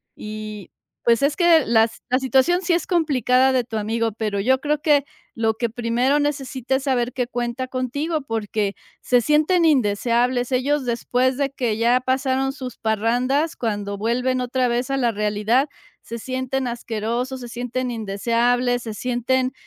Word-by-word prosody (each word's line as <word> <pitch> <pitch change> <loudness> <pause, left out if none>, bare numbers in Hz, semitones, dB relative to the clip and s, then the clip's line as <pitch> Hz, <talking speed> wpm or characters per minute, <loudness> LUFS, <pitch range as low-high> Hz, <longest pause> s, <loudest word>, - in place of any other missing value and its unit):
Y 215 -2 -7 0.3
pues, 235 +2 +3
es 295 +1 +2
que 340 -4 +5
la 225 0 +4 0.2
la 255 +1 +2
situación 265 +7 +2
sí 350 -1 +1
es 340 - 0
complicada 265 -6 +2
de 255 -1 +2
tu 230 -2 -5
amigo, 225 +1 -1
pero 210 -1 -2
yo 260 +6 +2
creo 300 0 0
que 290 -2 +3 0.3
lo 225 -1 0
que 235 +1 -1
primero 245 +4 +1
necesita 270 -3 -1
es 265 - -1
saber 250 -3 0
que 250 -2 -1
cuenta 240 +1 -3
contigo, 285 +5 -2
porque 215 -4 -2 0.3
se 245 - +3
sienten 310 +6 +3
indeseables 245 -1 +2
ellos 265 +2 +1
después 250 +2 0
de 280 -1 0
que 245 -5 -2
ya 235 +2 +3
pasaron 265 +1 0
sus 255 -4 -7
parrandas 245 +8 0
cuando 205 -3 -3
vuelven 250 +4 0
otra 250 0 0
vez 245 +2 -1
a 275 - +1
la 240 -3 +2
realidad, 210 +5 +1 0.4
se 235 +1 -7
sienten 260 +1 -2
asquerosos, 235 +2 -3
se 245 - -8
sienten 245 +2 -3
indeseables, 240 +3 0
se 220 - -5
sienten 250 +3 0
250 Hz, 160 wpm, -22 LUFS, 230-265 Hz, 0.4 s, que